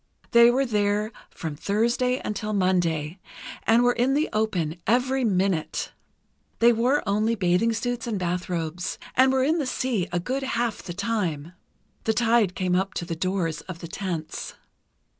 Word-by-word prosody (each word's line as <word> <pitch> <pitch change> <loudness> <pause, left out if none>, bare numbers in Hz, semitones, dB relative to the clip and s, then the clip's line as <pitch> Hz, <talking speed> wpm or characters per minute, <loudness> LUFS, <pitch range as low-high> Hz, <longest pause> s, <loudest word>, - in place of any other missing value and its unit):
They 235 0 +8
were 265 +3 +2
there 210 -1 0 0.2
from 160 -3 -6
Thursday 235 - +1
until 210 0 -3
Monday, 175 -4 0 0.5
and 230 +2 +5
were 245 0 +4
in 255 +3 +1
the 305 +2 +1
open 180 -7 0
every 255 +4 +2
minute. 190 -6 0 0.7
They 235 +1 +5
wore 250 +6 +1
only 215 +3 +1
bathing 185 +3 +2
suits 240 +1 -2
and 220 -3 -1
bathrobes, 175 -1 -3 0.2
and 260 +1 +5
were 265 -1 +2
in 315 +5 +2
the 285 - -1
sea 250 -7 -1
a 175 - 0
good 255 +10 -2
half 240 -4 -1
the 175 - -7
time. 180 -6 -2 0.5
The 220 - +1
tide 230 -5 +3
came 185 -2 0
up 190 -1 -1
to 170 - -3
the 170 -1 -4
doors 165 -3 -1
of 185 - -5
the 170 - -8
tents. 170 -3 -5
205 Hz, 160 wpm, -25 LUFS, 180-240 Hz, 0.7 s, They